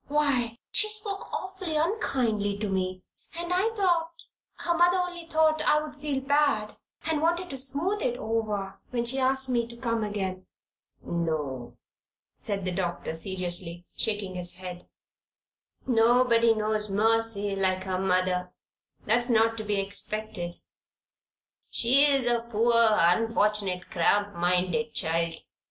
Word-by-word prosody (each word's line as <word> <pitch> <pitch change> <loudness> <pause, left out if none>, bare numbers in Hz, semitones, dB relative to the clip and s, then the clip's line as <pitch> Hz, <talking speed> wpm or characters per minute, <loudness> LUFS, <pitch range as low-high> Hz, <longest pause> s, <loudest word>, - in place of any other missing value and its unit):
"Why, 275 -6 +1
she 430 - +4
spoke 420 -2 -3
awfully 375 -4 -4
unkindly 250 - 0
to 210 +1 -2
me, 185 -1 -2 0.3
and 345 +1 -3
I 380 +5 +2
thought 345 -5 +2 0.5
her 345 - -1
mother 350 +2 +4
only 355 -2 -3
thought 315 -1 +3
I 300 0 +4
would 295 -1 -8
feel 285 -3 -1
bad 280 -6 +1 0.3
and 315 -2 0
wanted 345 +2 0
to 270 - -4
smooth 290 +11 0
it 245 0 -1
over, 215 -4 -2
when 240 -1 -1
she 260 +3 0
asked 265 0 +2
me 240 -2 0
to 235 0 -12
come 230 -2 -1
again." 190 -3 -4 0.6
"No," 155 -7 -3 0.6
said 195 -2 -3
the 185 - -1
doctor, 175 -3 -3
seriously, 175 0 -3
shaking 205 -4 -1
his 180 -1 -5
head. 180 -1 -8 1.0
"Nobody 235 -1 +4
knows 215 0 -1
Mercy 215 -1 +1
like 185 -1 0
her 185 -1 -2
mother. 185 -1 +1 0.5
That's 240 +4 +2
not 225 -1 +3
to 220 - -4
be 205 -1 0
expected. 200 -2 -3 1.1
She's 275 +2 +4
a 240 -1 +2
poor, 235 0 +1 0.2
unfortunate, 205 0 +1
cramp 205 +4 +2
minded 180 +6 0
child. 165 -1 0
225 Hz, 135 wpm, -27 LUFS, 190-280 Hz, 1.1 s, she